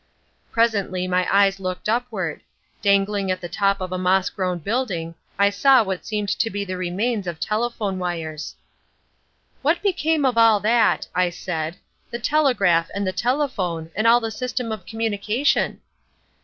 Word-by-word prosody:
Presently 200 -5 +1
my 180 0 +1
eyes 195 0 +4
looked 185 0 -4
upward: 220 -8 -2 0.4
dangling 200 -1 +2
at 185 0 0
the 175 - -6
top 195 +3 +1
of 185 -1 -5
a 185 - -2
moss 185 +1 +2
grown 185 -2 -2
building 180 - -2 0.2
I 200 +1 +4
saw 260 +4 +5
what 190 -3 -4
seemed 210 -2 -2
to 225 +3 0
be 205 -1 -3
the 185 -1 -4
remains 190 +4 -2
of 170 -2 -4
telephone 215 -3 -2
wires. 160 -4 -4 1.1
"What 315 +7 +1
became 320 -6 +1
of 245 -3 +2
all 225 -2 +6
that," 225 +1 +2
I 180 -1 +2
said, 170 -2 -4 0.3
"the 235 - -4
telegraph 235 - +2
and 200 0 -1
the 185 - -1
telephone 200 - -1
and 215 +4 +1
all 235 +1 +6
the 225 -1 -4
system 250 -1 -3
of 215 -5 -6
communication?" 225 +3 0
200 Hz, 155 wpm, -22 LUFS, 185-230 Hz, 1.1 s, all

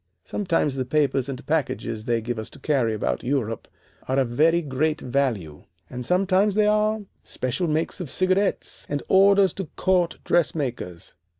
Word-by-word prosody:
Sometimes 165 -7 0
the 130 - 0
papers 135 -1 +1
and 135 0 -6
packages 130 -7 -2
they 120 -2 +1
give 120 0 -3
us 110 - -6
to - - -14
carry 125 -7 +1
about 105 - -2
Europe 120 -4 -2 0.4
are 130 - 0
of 130 -3 +2
very 165 +7 +3
great 150 +3 0
value, 120 - -2 0.3
and 125 0 -5
sometimes 190 +4 +2
they 210 0 +4
are 215 +1 +2 0.2
special 130 +8 -2
makes 160 +4 -1
of 165 - -5
cigarettes, 185 +4 0
and 145 0 -2
orders 195 0 +5
to 195 - -4
court 180 -2 +1
dressmakers. 130 - -1
145 Hz, 160 wpm, -24 LUFS, 125-185 Hz, 0.4 s, orders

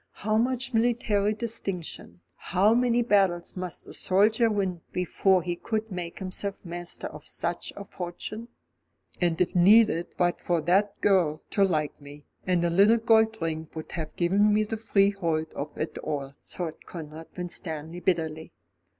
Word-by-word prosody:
How 215 0 +2
much 255 +3 0
military 225 -3 +2
distinction, 195 - -4
how 195 +5 +2
many 240 0 +3
battles 195 -6 +2
must 180 -2 -4
a - - -10
soldier 215 +5 +3
win 190 -5 -1
before 180 +1 +2
he 175 0 -2
could 220 +3 -3
make 175 -2 -5
himself 195 +1 -3
master 175 -1 -5
of - - -8
such - - -3
a 200 - -7
fortune? 185 +6 -6 0.7
"And 170 -2 +1
it 180 - +1
needed 190 -1 +5
but 175 0 +1
for 175 -2 +1
that 195 +5 +2
girl 170 -6 +2
to 200 - +3
like 155 -6 0
me, 145 +1 -12 0.2
and 180 -2 +2
a 170 - +1
little 200 +6 +5
gold 220 -1 +3
ring 160 -1 -3
would 160 - -7
have 160 -3 -5
given 195 +4 +3
me 210 +1 +3
the 215 +1 -3
freehold 195 -7 +1
of 145 +1 -6
it 155 - -3
all," 140 -2 -4
thought 170 -3 -6
Conrad 160 -1 -8
Winstanley 165 -2 -3
bitterly. 160 -3 -1
185 Hz, 155 wpm, -27 LUFS, 165-210 Hz, 0.7 s, needed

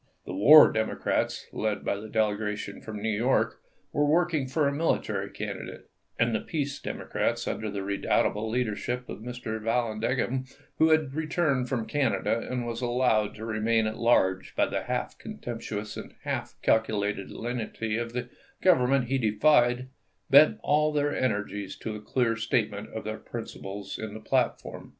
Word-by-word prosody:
The - - -6
war 145 +11 +9
Democrats, 110 0 -1
led 110 -1 -2
by - - +1
the 105 +2 -8
delegation 105 -2 -1
from 105 -1 -7
New 110 -1 +1
York, 120 +5 +1 0.3
were 145 - +2
working 155 -2 +2
for 145 +2 +1
a - - +1
military 160 +3 0
candidate; - - -7 0.3
and 115 0 +2
the 110 - +1
peace 145 -3 -3
Democrats, - - -2
under 110 - -2
the 100 -1 -4
redoubtable 100 +2 0
leader 115 -2 0
ship 125 +3 -4
of - - -6
Mr. 115 -1 -5
Vallandigham, 120 +3 0 0.3
who 160 - +6
had 155 -4 +3
returned 155 -5 0
from 120 -4 -1
Canada 115 -6 0
and 125 -1 -2
was 115 0 -4
allowed 120 -4 +1
to 110 - -7
remain 110 0 +1
at 110 0 -3
large 95 -5 +2
by - - +3
the - - -2
half - - -3
contemptuous 110 -3 -6
and - - -9
half - - -3
calculated 105 -3 +1
lenity 115 -2 -3
of 115 0 -3
the 125 0 -3 0.4
Government 135 -7 +4
he 135 +2 0
defied, 120 +2 +3 0.4
bent 145 +3 +7
all 150 +1 +3
their 145 -1 0
energies 105 -5 -2
to 110 - -5
a 105 - -7
clear 115 0 +1
statement 115 0 -1
of - - -6
their - - -4
principles 100 +1 -7
in 110 -1 -5
the - - -6
platform. 125 +2 -1
115 Hz, 160 wpm, -28 LUFS, 110-130 Hz, 0.4 s, war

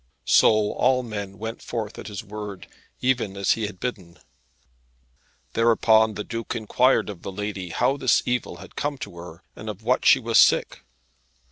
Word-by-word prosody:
So 110 - +4
all 130 0 +2
men 100 -4 -6
went 110 +3 -6
forth 110 -3 -5
at - - -8
his 105 -2 -6
word, 105 -2 -7 0.4
even 120 -6 0
as 100 - +1
he 110 -2 0
had 100 -3 -11
bidden. 95 -9 -5 1.4
Thereupon 110 -1 +4
the 105 - -4
Duke 115 +1 -5
inquired 120 +3 +2
of 100 -5 -8
the - - -6
lady 100 -2 -5
how 130 +10 +1
this 130 -3 +2
evil 125 0 -2
had - - -13
come 145 -1 -2
to 90 - -8
her, 85 0 -11
and 110 - -8
of 105 0 -7
what 125 +3 +1
she - - +7
was 115 -2 +3
sick. - - +3
110 Hz, 170 wpm, -24 LUFS, 100-120 Hz, 1.4 s, she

